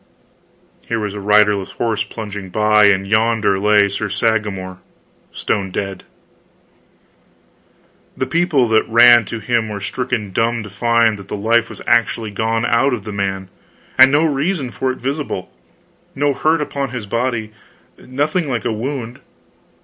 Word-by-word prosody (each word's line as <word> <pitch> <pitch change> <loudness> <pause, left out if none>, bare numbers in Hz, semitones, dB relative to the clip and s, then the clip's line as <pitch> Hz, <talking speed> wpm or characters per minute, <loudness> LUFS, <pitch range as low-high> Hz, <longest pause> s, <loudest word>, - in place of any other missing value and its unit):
Here 115 - -3
was 105 -2 -3
a 105 - -6
riderless 105 -1 +2
horse 110 -3 -1
plunging 105 -2 -7
by, 105 +1 +3
and 95 -1 +3
yonder 110 -1 +1
lay 105 0 +4
Sir 100 +2 -4
Sagramor, 100 -3 -2 0.5
stone 95 -2 -2
dead. 95 0 -5 2.1
The 130 - -1
people 165 -7 +1
that 110 0 +2
ran 120 0 +7
to 115 - -5
him 115 0 -1
were 105 -1 -5
stricken 110 0 -3
dumb 115 +3 0
to 105 - -10
find 115 0 +2
that 100 - -12
the - - -5
life 115 +3 +1
was - - -10
actually 115 -2 +1
gone 115 +2 -1
out 125 +3 +2
of 110 - -9
the 105 - -7
man 95 -1 -3 0.5
and 130 +1 +8
no 150 +3 +3
reason 145 -2 -1
for 130 +1 -2
it 130 - -7
visible, 135 -7 -4 0.6
no 145 +1 +1
hurt 155 +3 +1
upon 140 -2 -3
his 120 -4 -6
body, 115 0 -2 0.5
nothing 145 +5 -2
like 120 -5 -3
a - - 0
wound. 120 +1 -5
110 Hz, 150 wpm, -18 LUFS, 105-125 Hz, 2.1 s, and